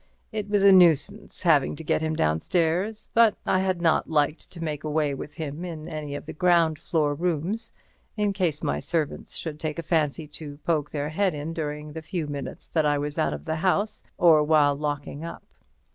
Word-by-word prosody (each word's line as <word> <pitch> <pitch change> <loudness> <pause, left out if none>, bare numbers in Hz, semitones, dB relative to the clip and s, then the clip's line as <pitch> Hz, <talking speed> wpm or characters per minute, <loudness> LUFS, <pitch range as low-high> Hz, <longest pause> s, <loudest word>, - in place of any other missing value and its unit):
It 210 -2 -4
was 205 -1 +2
a 200 - +8
nuisance 185 +3 +3
having 155 -6 +3
to 160 - -8
get 155 - +1
him 160 0 -1
downstairs, 165 - 0
but 230 -2 +5
I 185 - +2
had 185 -2 -1
not 165 - +2
liked 150 0 0
to 170 -2 -8
make 150 -2 -3
away 150 -1 0
with 145 +2 -7
him 155 0 -5
in 160 -3 -6
any 150 -3 -5
of - - -7
the - - -7
ground 165 -2 +3
floor 150 -3 0
rooms, 180 +8 -2 0.5
in 205 -1 +1
case 170 -6 -1
my 70 +1 0
servant 155 - -1
should 155 -2 -5
take 155 -1 -3
a 170 - -3
fancy 155 -1 0
to 145 -1 -8
poke 150 -3 0
his 150 0 -3
head 190 -1 +1
in 150 +3 -4
during 150 -1 -4
the 160 - -6
few 160 0 -3
minutes 145 -2 -6
that 160 - +1
I 145 -1 +2
was 145 +1 -3
out 75 - +1
of 75 - -10
the 160 - -2
house, 200 +5 0
or 165 -3 +6
while 150 -2 +4
locking 145 0 -4
up. 170 - -7
160 Hz, 205 wpm, -26 LUFS, 150-175 Hz, 0.5 s, a